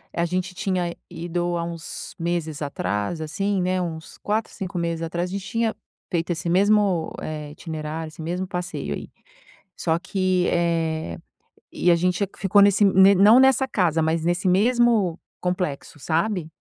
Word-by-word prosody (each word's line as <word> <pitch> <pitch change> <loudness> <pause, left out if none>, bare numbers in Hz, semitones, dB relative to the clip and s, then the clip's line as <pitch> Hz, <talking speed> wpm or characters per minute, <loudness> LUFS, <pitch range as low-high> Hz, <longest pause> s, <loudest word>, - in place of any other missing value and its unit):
a 170 - +1
gente 180 +2 -2
tinha 185 -3 -1
ido 175 0 -2
há 170 - -2
uns 170 -1 -7
meses 165 -3 -2
atrás 140 -1 -2
assim, 190 +6 -1
né, 185 +1 0
uns 160 -2 -6
4, 215 +2 -2
5 190 -1 -5
meses 170 -1 -1
atrás, 170 +2 -2
a - - -7
gente 200 -1 -4
tinha 230 0 -1 0.3
feito 170 -2 -1
esse 170 +1 -2
mesmo, 195 -2 +3
eh, 150 -1 -5
itinerário, 160 0 -5
esse 155 +1 -11
mesmo 180 +4 -3
passeio 180 -1 -4
aí, - - -8 0.7
só 165 0 0
que, 185 -1 0
eh, 165 - 0 0.7
a - - +6
gente 180 +3 +1
ficou 200 +1 +4
nesse 200 +1 +5
não 195 +4 +7
nessa 265 0 +4
casa, 165 - +1
mas 160 +1 0
nesse 175 +3 0
mesmo 215 -2 +3 0.2
complexo, 180 -6 -3
sabe? 170 +4 -1
175 Hz, 150 wpm, -23 LUFS, 165-195 Hz, 0.7 s, não